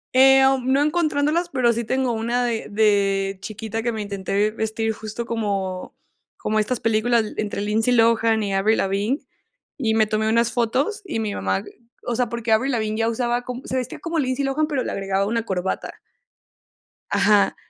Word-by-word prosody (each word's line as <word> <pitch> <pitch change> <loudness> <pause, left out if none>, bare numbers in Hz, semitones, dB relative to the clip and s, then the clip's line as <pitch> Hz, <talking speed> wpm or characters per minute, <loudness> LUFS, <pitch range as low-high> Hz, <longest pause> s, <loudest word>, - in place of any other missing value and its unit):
Em, 270 0 +6
no 275 +2 +4
encontrándolas, 310 +1 +1
pero 245 -5 +2
sí 235 - -2
tengo 260 0 0
una 235 +2 0
de 230 -2 -2
de 200 -2 +1
chiquita 220 +2 -5
que 235 +1 -1
me 220 - -5
intenté 200 +1 -1
vestir 220 0 -2
justo 220 +2 -6
como 200 -5 -3 0.4
como 215 0 0
estas 230 +3 -1
películas 225 +1 +2
le 215 - -4
entre 205 -1 -3
Lindsay 220 +4 +1
Lohan 225 -1 +3
y 200 -1 -2
Avril 205 +3 +2
Lavigne, 200 +8 0 0.5
y 225 -6 0
me 220 -1 +4
tomé 215 +1 0
unas 230 +1 +2
fotos 260 - 0
y 325 -11 -3
mi 215 -2 -2
mamá, 95 0 -1 0.4
o 240 - -1
sea, 245 -1 0
porque 235 -1 -3
Avril 255 +5 +2
Lavigne 220 -1 -1
ya 225 0 +2
usaba 240 +1 0
co 250 0 -5
se - - -3
vestía 255 -1 -3
como 330 -1 -2
Lindsay 260 0 0
Lohan, 285 +3 0
pero 285 -4 -1
le - - -3
agregaba 195 0 -1
una 230 +2 -1
corbata. 190 -2 -3 1.2
Ajá. 205 -2 +3
225 Hz, 180 wpm, -22 LUFS, 210-255 Hz, 1.2 s, Em